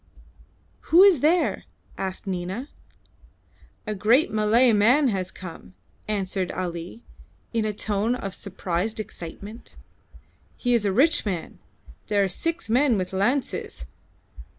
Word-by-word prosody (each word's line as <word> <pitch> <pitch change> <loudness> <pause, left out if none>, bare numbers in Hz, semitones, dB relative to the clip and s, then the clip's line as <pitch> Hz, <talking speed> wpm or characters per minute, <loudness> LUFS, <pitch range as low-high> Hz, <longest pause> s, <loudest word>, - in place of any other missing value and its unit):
"Who 345 +4 +8
is 390 -7 +6
there?" 330 +6 +2 0.3
asked 190 +1 -5
Nina. 190 +8 -4 1.2
"A 215 - -2
great 220 +9 +3
Malay 220 +3 +4
man 250 +7 +4
has 190 -4 -2
come," 165 - -11 0.3
answered 190 -3 -2
Ali, 175 +4 -5 0.5
in 225 -2 0
a 215 - 0
tone 210 +3 0
of 195 -6 -5
suppressed 195 +2 -3
excitement. 205 +3 -8 0.8
"He 245 -1 0
is 230 -3 +2
a 200 - +2
rich 300 - +3
man. 185 -6 -4 0.5
There 205 -1 +2
are - - +2
six 330 - -2
men 245 +1 +3
with 185 0 -3
lances. 195 - -1
210 Hz, 125 wpm, -25 LUFS, 190-245 Hz, 1.2 s, Who